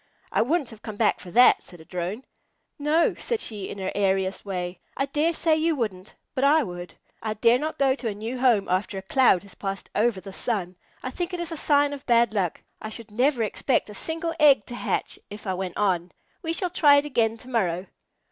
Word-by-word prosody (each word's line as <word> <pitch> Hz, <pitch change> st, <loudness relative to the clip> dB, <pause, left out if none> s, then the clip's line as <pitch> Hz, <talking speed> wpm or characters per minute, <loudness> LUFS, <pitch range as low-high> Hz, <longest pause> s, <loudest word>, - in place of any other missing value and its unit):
"I -, -, +2 dB
wouldn't 290 Hz, +1 st, 0 dB
have 220 Hz, -1 st, -13 dB
come 215 Hz, -2 st, -7 dB
back 215 Hz, 0 st, +2 dB
for 180 Hz, -, -10 dB
that," 245 Hz, +7 st, +6 dB
said 175 Hz, -, -14 dB
a 160 Hz, -, -14 dB
Drone. 180 Hz, +8 st, -4 dB, 0.5 s
"No," 305 Hz, +3 st, +3 dB
said 470 Hz, -2 st, -1 dB
she, 210 Hz, -, -4 dB
in -, -, -7 dB
her 190 Hz, -1 st, -3 dB
airiest 190 Hz, -1 st, 0 dB
way, 180 Hz, -2 st, -4 dB, 0.2 s
"I 275 Hz, -, +1 dB
dare 295 Hz, +4 st, +1 dB
say 325 Hz, -1 st, +2 dB
you 320 Hz, 0 st, +1 dB
wouldn't, 205 Hz, -7 st, -4 dB, 0.2 s
but 260 Hz, -, -1 dB
I 300 Hz, +2 st, +5 dB
would. 175 Hz, -4 st, -7 dB, 0.3 s
I 215 Hz, -1 st, -3 dB
dare 235 Hz, +3 st, +4 dB
not 310 Hz, +2 st, -3 dB
go 270 Hz, -1 st, +3 dB
to 260 Hz, -3 st, -5 dB
a 215 Hz, -, -1 dB
new 225 Hz, +5 st, -5 dB
home 240 Hz, -6 st, +3 dB
after 190 Hz, +2 st, -1 dB
a 190 Hz, -, -5 dB
cloud 200 Hz, -4 st, +4 dB
has 200 Hz, -, -11 dB
passed 195 Hz, -1 st, -5 dB
over 215 Hz, -2 st, +1 dB
the 195 Hz, 0 st, -10 dB
sun. 190 Hz, -5 st, -2 dB, 0.3 s
I 255 Hz, -, -3 dB
think 355 Hz, +4 st, -3 dB
it -, -, -6 dB
is 345 Hz, -1 st, -3 dB
a -, -, -3 dB
sign 290 Hz, -1 st, +3 dB
of 280 Hz, -, -8 dB
bad 235 Hz, -2 st, +4 dB
luck. 190 Hz, -6 st, -1 dB, 0.2 s
I 215 Hz, -, -5 dB
should 220 Hz, -1 st, -5 dB
never 245 Hz, +2 st, +2 dB
expect 220 Hz, +1 st, 0 dB
a -, -, -9 dB
single 330 Hz, -, -3 dB
egg 280 Hz, -8 st, +6 dB
to 240 Hz, -, -7 dB
hatch -, -, -2 dB
if 205 Hz, +1 st, -10 dB
I 190 Hz, -, -1 dB
went 185 Hz, -1 st, -4 dB
on. 180 Hz, -4 st, +1 dB, 0.3 s
We 325 Hz, -3 st, -2 dB
shall 355 Hz, +1 st, 0 dB
try 290 Hz, -5 st, +6 dB
it 285 Hz, +1 st, +3 dB
again 230 Hz, -5 st, +1 dB
to 245 Hz, -, -13 dB
morrow." 185 Hz, -7 st, 0 dB
230 Hz, 230 wpm, -25 LUFS, 195-285 Hz, 0.5 s, that